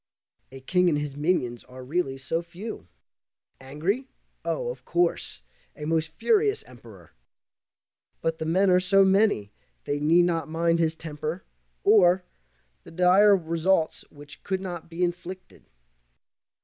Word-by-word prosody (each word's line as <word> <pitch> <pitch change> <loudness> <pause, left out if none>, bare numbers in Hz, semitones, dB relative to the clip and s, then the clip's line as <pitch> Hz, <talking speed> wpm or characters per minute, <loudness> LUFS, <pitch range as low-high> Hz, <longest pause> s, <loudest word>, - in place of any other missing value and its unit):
A 135 0 -11
king 180 +6 +2
and 150 - +1
his 145 -2 -4
minions 145 -6 -1
are 130 0 -11
really 135 -1 -2
so 135 +5 -2
few. 175 - -8 0.7
Angry? 165 - -3 0.4
Oh, - - -2
of - - -11
course, 170 - -1 0.3
a 150 - -7
most 160 0 -1
furious 425 - +1
Emperor! - - -16 1.1
But 165 0 -2
the 160 - -3
men 185 +3 +3
are 180 - +5
so 195 +2 +4
many 190 - +2 0.3
they 145 - -2
need 165 +4 +4
not 165 -3 -1
mind 165 +1 +1
his 160 -1 +1
temper, 155 +2 -5 0.4
or 185 -3 +5 0.6
The - - -13
dire 185 +4 +5
results 165 0 0
which 145 -1 -13
could 190 0 -2
not 175 -3 -7
be 170 +2 -3
inflicted. 180 +1 -5
170 Hz, 135 wpm, -26 LUFS, 155-185 Hz, 1.1 s, are